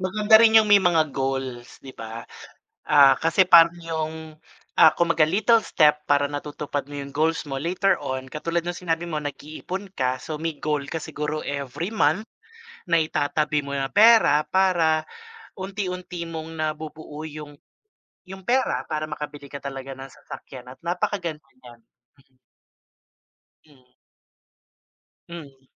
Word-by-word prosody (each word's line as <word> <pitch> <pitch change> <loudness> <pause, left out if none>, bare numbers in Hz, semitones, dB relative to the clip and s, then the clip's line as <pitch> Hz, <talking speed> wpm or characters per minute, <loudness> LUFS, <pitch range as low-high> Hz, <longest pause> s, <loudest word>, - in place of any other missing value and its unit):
Maganda 210 +4 +4
rin 225 0 +7
yung 215 - -1
may 205 - +8
mga 175 -5 +3
goals, 135 -3 -4
'di 135 -1 -12
ba? 115 +1 -7 0.6
Ah, 140 -2 +6
kasi 170 +3 +2
parang 165 -1 +8
yung 160 -1 -3 0.7
ah, - - +8
kumbaga, 170 -2 +3
little 220 +5 +3
step 150 -1 +3
para 145 0 +3
natutupad 145 0 -5
mo - - -12
yung 140 - -7
goals 160 +3 0
mo 135 - -4
later 180 +5 +1
on, 130 -1 -3
katulad 165 +3 -2
nung 175 0 -4
sinabi 170 -2 -2
mo 160 - -3
nag-iipon 155 +7 -7
ka 130 -1 0
so 155 +3 -6
may 165 0 -2
goal 150 -1 -1
ka - - -2
siguro 150 0 -4
every 140 +4 -4
month 185 0 +1 0.7
nai-tatabi 150 -2 +1
mo 140 - -7
ng 135 -1 -1
pera 215 -8 +6
para 170 -5 +2 0.6
unti-unti 185 -3 -5
mong 160 -1 -6
na-bubuo 155 -1 -5
yung, 150 -1 -9 0.7
yung 190 +1 -10
pera 260 +3 0
para 155 0 -2
maka-bili 150 -1 -7
ka 140 - -7
talaga 135 -1 -6
ng 135 0 -9
sasakyan 125 0 -11
at 130 - -12
napa-kaganda 175 -3 -3 0.2
nyan, 120 -1 -14 0.4
mm. 130 -1 -35 1.3
Mm. 135 -5 -24 1.4
Mm. 140 -6 -11
155 Hz, 140 wpm, -24 LUFS, 145-175 Hz, 1.4 s, may